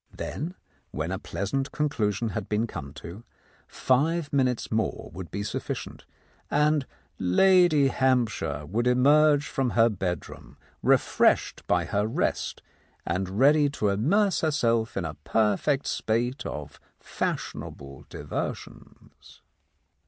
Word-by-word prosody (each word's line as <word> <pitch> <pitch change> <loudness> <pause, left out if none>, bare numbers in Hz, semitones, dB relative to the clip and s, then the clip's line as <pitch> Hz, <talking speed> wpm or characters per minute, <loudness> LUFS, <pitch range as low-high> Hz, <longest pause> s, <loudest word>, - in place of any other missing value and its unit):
Then, 170 +6 -5 0.3
when 75 +4 -4
a 95 - -2
pleasant 100 - -3
conclusion 115 -7 -1
had 100 - -5
been 105 +2 +1
come 70 -10 -7
to, 95 +7 -10 0.4
five 145 +4 0
minutes 130 -3 +1
more 110 0 -2
would 90 -2 -7
be 100 +5 -4
sufficient, 105 - -5 0.4
and 150 -1 +2 0.3
Lady 155 - +4
Hamp 130 -3 +2
shire 75 -7 -4
would 115 +10 -1
emerge 145 +4 +4
from 135 -2 -1
her 115 0 +6
bedroom 90 -6 -5 0.2
refreshed - - +2
by 90 -1 +2
her 100 +4 0
rest, 115 - -2 0.4
and 95 +3 -2
ready 145 +3 +5
to 110 -7 -1
immerse 185 - +2
herself 115 -8 +1
in 95 - -1
a 80 - -4
perfect 110 - +1
spate 120 +4 -1
of 70 -1 -7 0.2
fashionable 70 -1 -5
diversions. - - -7
115 Hz, 120 wpm, -26 LUFS, 95-145 Hz, 0.4 s, her